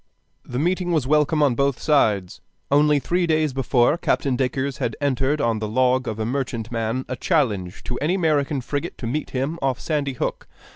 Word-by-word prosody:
The 125 Hz, -, -6 dB
meeting 175 Hz, +4 st, 0 dB
was 155 Hz, -6 st, +1 dB
welcome 150 Hz, +2 st, +3 dB
on 140 Hz, -4 st, +3 dB
both 140 Hz, +1 st, 0 dB
sides. 105 Hz, -, +1 dB, 0.3 s
Only 150 Hz, +1 st, +4 dB
three 175 Hz, +5 st, 0 dB
days 155 Hz, -3 st, +1 dB
before, 130 Hz, +3 st, +2 dB
Captain 140 Hz, -6 st, +1 dB
Dacres 130 Hz, +2 st, -1 dB
had -, -, -2 dB
entered 140 Hz, +1 st, 0 dB
on 115 Hz, -4 st, +1 dB
the 110 Hz, -, -3 dB
log 130 Hz, +3 st, +2 dB
of 110 Hz, -, -3 dB
a 110 Hz, -, -2 dB
merchantman 115 Hz, -1 st, -2 dB
a 130 Hz, -, -3 dB
challenge 110 Hz, -, 0 dB
to 125 Hz, -, -4 dB
any 160 Hz, +6 st, +1 dB
American 150 Hz, -6 st, +1 dB
frigate 140 Hz, +3 st, -4 dB
to -, -, -6 dB
meet 140 Hz, +6 st, -2 dB
him 140 Hz, +6 st, -2 dB
off 135 Hz, -2 st, 0 dB
Sandy 145 Hz, -4 st, -1 dB
Hook. 125 Hz, -, -3 dB
135 Hz, 185 wpm, -23 LUFS, 120-150 Hz, 0.3 s, Only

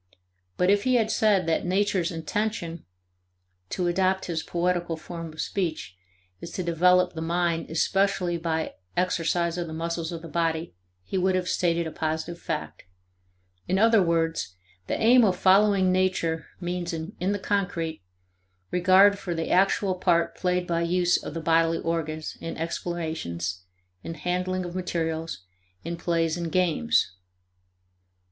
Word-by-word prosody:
But 180 Hz, +2 st, +3 dB
if 205 Hz, 0 st, +3 dB
he 255 Hz, 0 st, +2 dB
had 225 Hz, -2 st, +2 dB
said 205 Hz, -5 st, +3 dB
that 165 Hz, -1 st, +1 dB
nature's 185 Hz, -1 st, +1 dB
"intention" 170 Hz, 0 st, -3 dB, 0.8 s
(to 180 Hz, -, -2 dB
adopt 185 Hz, +2 st, +1 dB
his 165 Hz, -2 st, -2 dB
poetical 175 Hz, -1 st, -1 dB
form 165 Hz, 0 st, -7 dB
of 155 Hz, -, -14 dB
speech) 165 Hz, -, -3 dB, 0.4 s
is 170 Hz, -, -7 dB
to 185 Hz, -, -3 dB
develop 180 Hz, +2 st, +3 dB
the 160 Hz, -, -5 dB
mind 170 Hz, 0 st, 0 dB
especially 185 Hz, +2 st, +1 dB
by 160 Hz, -1 st, -2 dB, 0.2 s
exercise 170 Hz, -1 st, 0 dB
of 170 Hz, -, -3 dB
the 160 Hz, -, -6 dB
muscles 165 Hz, 0 st, -3 dB
of 165 Hz, -1 st, -6 dB
the -, -, -7 dB
body 165 Hz, 0 st, -1 dB, 0.3 s
he 190 Hz, -, -2 dB
would 185 Hz, 0 st, +2 dB
have 180 Hz, -1 st, -1 dB
stated 170 Hz, -2 st, +1 dB
a 160 Hz, -, -4 dB
positive 160 Hz, +2 st, -3 dB
fact. 155 Hz, -, -5 dB, 0.8 s
In 185 Hz, -, +1 dB
other 225 Hz, +1 st, +5 dB
words, 165 Hz, -, 0 dB, 0.3 s
the -, -, -1 dB
aim 240 Hz, +2 st, +6 dB
of 190 Hz, -4 st, +2 dB
following 190 Hz, 0 st, +4 dB
nature 180 Hz, -4 st, 0 dB
means, 175 Hz, -1 st, -3 dB
in 165 Hz, +4 st, -5 dB, 0.2 s
the 205 Hz, -, 0 dB
concrete, 180 Hz, -, -2 dB, 0.7 s
regard 190 Hz, +3 st, +5 dB
for 175 Hz, -4 st, -3 dB
the 165 Hz, 0 st, -2 dB
actual 195 Hz, +1 st, +3 dB
part 175 Hz, -2 st, +1 dB
played 180 Hz, -1 st, 0 dB
by 170 Hz, -1 st, 0 dB
use 175 Hz, +1 st, +2 dB
of -, -, -7 dB
the 165 Hz, -, -3 dB
bodily 165 Hz, 0 st, +3 dB
organs 155 Hz, -2 st, -3 dB
in 165 Hz, -, -5 dB
explorations, 160 Hz, -, -4 dB, 0.4 s
in 165 Hz, -, -6 dB
handling 180 Hz, +2 st, -2 dB
of 175 Hz, -, -6 dB
materials, 165 Hz, -, -3 dB, 0.4 s
in 170 Hz, +1 st, -3 dB
plays 165 Hz, -1 st, 0 dB
and 170 Hz, -2 st, -3 dB
games. 155 Hz, -, +2 dB
170 Hz, 150 wpm, -26 LUFS, 165-185 Hz, 0.8 s, aim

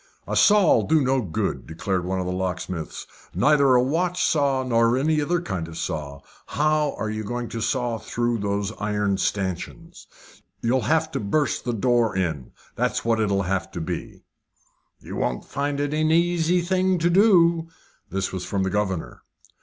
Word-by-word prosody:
"A -, -, -2 dB
saw'll 205 Hz, -4 st, +5 dB
be 160 Hz, 0 st, +3 dB
no 135 Hz, -1 st, +1 dB
good," 90 Hz, -8 st, -3 dB
declared 95 Hz, +1 st, -2 dB
one 95 Hz, +1 st, -1 dB
of 90 Hz, -, -2 dB
the 90 Hz, -, -2 dB
locksmiths. 90 Hz, -2 st, -4 dB, 0.3 s
"Neither 140 Hz, -2 st, +4 dB
a 125 Hz, -, +4 dB
watch 175 Hz, +6 st, 0 dB
saw 140 Hz, -4 st, +2 dB
nor 115 Hz, -1 st, +2 dB
any 155 Hz, +3 st, +1 dB
other 175 Hz, +4 st, 0 dB
kind 95 Hz, -, -4 dB
of 80 Hz, 0 st, -9 dB
saw. 70 Hz, -2 st, -4 dB, 0.3 s
How 150 Hz, -1 st, +1 dB
are 110 Hz, -, -3 dB
you 110 Hz, 0 st, -4 dB
going 120 Hz, +2 st, -4 dB
to 115 Hz, -, -5 dB
saw 120 Hz, -1 st, -1 dB
through 120 Hz, +1 st, -1 dB
those 100 Hz, 0 st, -1 dB
iron 105 Hz, -1 st, 0 dB
stanchions? 100 Hz, -, -4 dB, 0.5 s
You'll 125 Hz, +3 st, +1 dB
have 160 Hz, 0 st, +2 dB
to -, -, -2 dB
burst 120 Hz, +7 st, 0 dB
the 120 Hz, -, -1 dB
door 115 Hz, -2 st, +1 dB
in, 80 Hz, -8 st, -2 dB, 0.2 s
that's -, -, -1 dB
what 115 Hz, -1 st, +2 dB
it'll 100 Hz, -2 st, +1 dB
have 95 Hz, +1 st, -2 dB
to -, -, -4 dB
be." 80 Hz, -, -6 dB, 0.8 s
"You -, -, -7 dB
won't -, -, -2 dB
find 140 Hz, 0 st, -2 dB
it 145 Hz, +1 st, -1 dB
an 155 Hz, 0 st, +1 dB
easy 170 Hz, +1 st, +2 dB
thing 185 Hz, +1 st, +1 dB
to 170 Hz, +1 st, +1 dB
do." 170 Hz, -4 st, +4 dB, 0.4 s
This 95 Hz, +1 st, -2 dB
was 95 Hz, -1 st, -4 dB
from 100 Hz, 0 st, -1 dB
the 95 Hz, -, -1 dB
governor. 95 Hz, -5 st, -2 dB
120 Hz, 175 wpm, -24 LUFS, 95-155 Hz, 0.8 s, saw'll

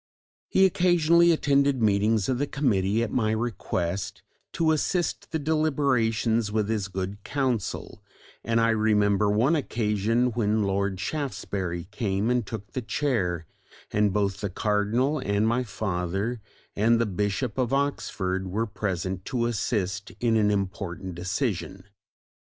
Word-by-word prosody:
He 190 Hz, -, +5 dB
occasionally 170 Hz, -2 st, +4 dB
attended 140 Hz, -3 st, +2 dB
meetings 105 Hz, -1 st, +2 dB
of 130 Hz, -2 st, 0 dB
the 145 Hz, -, 0 dB
committee 110 Hz, -6 st, +1 dB
at 115 Hz, -, -3 dB
my 110 Hz, -4 st, +1 dB
request 100 Hz, -5 st, -2 dB, 0.3 s
to 160 Hz, -1 st, +2 dB
assist 170 Hz, +3 st, -1 dB
the 160 Hz, -, 0 dB
deliberations 130 Hz, -8 st, +1 dB
with 105 Hz, -1 st, 0 dB
his 105 Hz, -3 st, -1 dB
good 95 Hz, +2 st, -5 dB
counsel, 125 Hz, -8 st, -2 dB, 0.4 s
and 115 Hz, 0 st, +1 dB
I 115 Hz, 0 st, +3 dB
remember 105 Hz, -2 st, +2 dB
one 120 Hz, +10 st, +3 dB
occasion 115 Hz, -2 st, 0 dB
when 110 Hz, -2 st, +1 dB
Lord 100 Hz, -1 st, -1 dB
Shaftesbury 95 Hz, -, -3 dB
came 105 Hz, 0 st, 0 dB
and 125 Hz, -1 st, +2 dB
took 105 Hz, -1 st, -7 dB
the 130 Hz, -, -3 dB
chair, 110 Hz, -, -1 dB, 0.5 s
and 105 Hz, -1 st, +3 dB
both 100 Hz, -1 st, 0 dB
the 100 Hz, -, -2 dB
Cardinal 110 Hz, +9 st, +1 dB
and 100 Hz, -2 st, +1 dB
my 120 Hz, +2 st, +2 dB
father 100 Hz, +1 st, -2 dB, 0.3 s
and 115 Hz, +3 st, +3 dB
the 115 Hz, -, +2 dB
Bishop 105 Hz, +5 st, -2 dB
of 125 Hz, -1 st, 0 dB
Oxford 95 Hz, -9 st, -1 dB
were 105 Hz, +5 st, -1 dB
present 95 Hz, -3 st, -3 dB
to 120 Hz, -2 st, -1 dB
assist 105 Hz, -4 st, -2 dB
in 115 Hz, -2 st, +2 dB
an 105 Hz, -2 st, +3 dB
important 95 Hz, -2 st, -3 dB
decision. 95 Hz, +1 st, -3 dB
110 Hz, 135 wpm, -26 LUFS, 100-125 Hz, 0.5 s, He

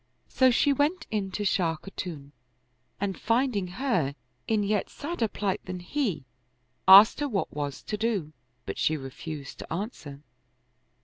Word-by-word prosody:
So 260 Hz, -1 st, +4 dB
she 280 Hz, +3 st, +3 dB
went 310 Hz, +5 st, 0 dB
in 205 Hz, -3 st, -1 dB
to 205 Hz, +2 st, -3 dB
Shah 170 Hz, -4 st, +1 dB
Khatun 155 Hz, -5 st, -7 dB, 0.7 s
and 195 Hz, -1 st, -2 dB
finding 230 Hz, -4 st, +1 dB
her 180 Hz, -, -1 dB, 0.3 s
in 215 Hz, -2 st, +2 dB
yet 205 Hz, 0 st, 0 dB
sadder 295 Hz, -6 st, -2 dB
plight 200 Hz, -2 st, -2 dB
than 185 Hz, -1 st, -5 dB
he, 195 Hz, -, -2 dB, 0.6 s
asked 200 Hz, +6 st, +9 dB
her 290 Hz, -1 st, -1 dB
what 200 Hz, -6 st, -2 dB
was 145 Hz, -2 st, -4 dB
to 210 Hz, -, -3 dB
do; 205 Hz, -9 st, -1 dB, 0.3 s
but -, -, -5 dB
she 155 Hz, -, +2 dB
refused 140 Hz, +2 st, -8 dB
to -, -, -9 dB
answer. 160 Hz, -, -5 dB
195 Hz, 145 wpm, -27 LUFS, 160-230 Hz, 0.7 s, asked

